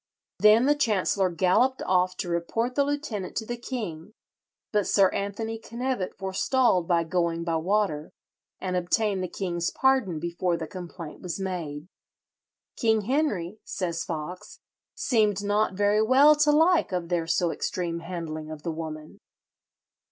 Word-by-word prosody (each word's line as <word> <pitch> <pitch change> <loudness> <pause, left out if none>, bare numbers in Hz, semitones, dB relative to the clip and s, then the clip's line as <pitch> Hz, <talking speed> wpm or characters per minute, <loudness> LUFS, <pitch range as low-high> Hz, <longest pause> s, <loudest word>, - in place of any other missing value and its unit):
Then 215 +3 +6
the 290 - +5
chancellor 200 -7 +1
galloped 185 +10 +2
off 185 0 +1
to - - -3
report 175 +9 -1
the 280 - +3
lieutenant 280 -10 -3
to 220 - -2
the 240 - -3
king; 215 -7 -6 0.6
but 210 -2 +1
Sir 195 -2 +4
Anthony 220 +3 -3
Knevet 235 -3 -3
forestalled 190 0 +1
by 170 -2 +3
going 170 0 -1
by 165 -1 0
water, 165 -3 0 0.5
and 185 -1 -3
obtained 190 +2 +1
the 185 - -2
king's 175 -2 -2
pardon 260 -11 +1
before 170 +1 -1
the 165 - -4
complaint 175 -3 -9
was 180 +1 -4
made. 170 -5 -4 0.9
"King 220 -3 +2
Henry," 215 - -1
says 170 -3 -3
Foxe, 170 +3 -6 0.4
"seemed 210 -5 +1
not 205 -1 +1
very 205 +2 +3
well 270 +7 +6
to 300 0 +4
like 320 - +4
of 175 -2 -2
their 170 -2 0
so 170 0 +1
extreme 170 -1 -3
handling 165 -3 -6
of 155 -2 -8
the 170 - -2
woman." 155 -1 -7
185 Hz, 145 wpm, -26 LUFS, 170-225 Hz, 0.9 s, Then